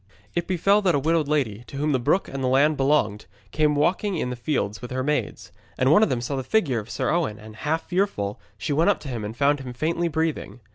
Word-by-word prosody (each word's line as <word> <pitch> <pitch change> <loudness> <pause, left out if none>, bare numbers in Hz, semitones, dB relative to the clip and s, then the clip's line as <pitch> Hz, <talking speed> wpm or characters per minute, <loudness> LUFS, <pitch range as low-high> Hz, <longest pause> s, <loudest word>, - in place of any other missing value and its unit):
It 170 0 -2
befell 195 +3 +3
that 180 -5 +2
a - - +2
widowed 160 +1 +1
lady, 125 -8 -1
to 140 - -8
whom 150 +2 0
the 130 - +2
brook 180 +10 +1
and 135 -1 -5
the - - +1
land 140 +4 +4
belonged, 135 -7 +1 0.2
came 150 -1 +2
walking 180 +6 +1
in 125 - -2
the - - -3
fields 120 -5 -2
with 125 - -7
her 130 0 -2
maids. 120 -10 -2 0.3
And 130 +2 +3
one 185 - +6
of 220 - +4
them 125 -2 -1
saw 130 +4 -3
the 130 - -2
figure 145 - +1
of 105 +2 -9
Sir - - -1
Owen 160 -12 0
and, 110 0 -12
half 160 +6 -2
fearful, 175 - -1 0.2
she 145 - -2
went 165 +7 +3
up 205 - +2
to 140 - -7
him 120 -4 -4
and 110 +3 -6
found 145 +1 +3
him 130 -2 -7
faintly 165 +6 -1
breathing. 160 -4 -2
145 Hz, 250 wpm, -24 LUFS, 125-165 Hz, 0.3 s, one